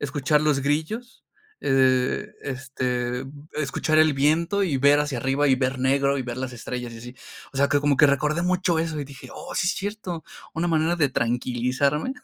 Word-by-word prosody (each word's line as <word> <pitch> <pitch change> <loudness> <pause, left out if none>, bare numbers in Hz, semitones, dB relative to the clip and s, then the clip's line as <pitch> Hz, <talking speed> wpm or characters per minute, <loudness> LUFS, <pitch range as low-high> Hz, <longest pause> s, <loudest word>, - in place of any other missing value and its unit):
escuchar 145 +1 +1
los 150 -3 +2
grillos, 160 - -3 0.4
eh, - - -2
de, 130 -1 +2
este, 125 -2 -3 0.3
escuchar 155 +2 0
el 155 -1 +5
viento 165 +8 +2
y 155 -7 0
ver 140 +2 +5
hacia 145 -4 -2
arriba 135 +4 +1
y 130 - +5
ver 130 0 -1
negro 140 +1 +2
y - - -2
ver 120 0 -5
las 130 -1 -4
estrellas 120 0 -6
y 115 - -9
así. 120 +2 -10 0.4
O - - -10
sea, 140 +1 +3
que 145 - +3
como 145 -2 +2
que 150 - +7
recordé 150 +4 +1
mucho 180 -2 +1
eso 165 -2 -3
y 145 - -4
dije: 140 -2 -12
"Oh, - - -8
sí 180 - +1
es - - +1
cierto". 190 -5 -5 0.3
Una 165 +2 0
manera 165 +1 +1
de 150 -4 +2
tranquilizarme 125 - 0
140 Hz, 195 wpm, -24 LUFS, 130-155 Hz, 0.4 s, que